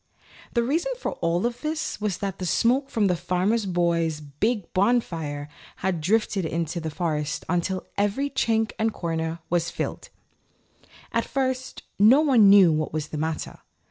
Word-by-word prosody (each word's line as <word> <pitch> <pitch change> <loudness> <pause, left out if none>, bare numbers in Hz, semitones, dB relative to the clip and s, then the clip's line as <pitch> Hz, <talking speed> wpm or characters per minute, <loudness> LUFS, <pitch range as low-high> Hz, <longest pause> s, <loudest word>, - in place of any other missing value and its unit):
The 235 - +3
reason 325 - 0
for - - -3
all 170 +1 0
this 305 +5 -3
was 210 -4 -1
that 195 -1 -4
the 185 - -3
smoke 255 +8 +2
from 225 -6 +1
the 180 -2 +2
Farmer 185 +6 0
Boy's 170 -3 +1
big 170 - -2
bonfire 165 -9 0 0.3
had 185 -4 -2
drifted 200 +2 +1
into 165 +1 -2
the 160 -1 -4
forest 150 -2 -2
until 180 +2 -1
every 215 +8 0
chink 225 -4 +1
and 220 0 +2
corner 165 -2 -3
was 170 -1 +1
filled. - - -5 1.0
At - - +1
first 260 -1 -2 0.2
no 235 +8 +7
one 250 -9 +6
knew 195 -4 +8
what 155 -1 -1
was 155 -1 -3
the 150 - -4
matter. 160 0 -3
190 Hz, 155 wpm, -25 LUFS, 165-235 Hz, 1.0 s, knew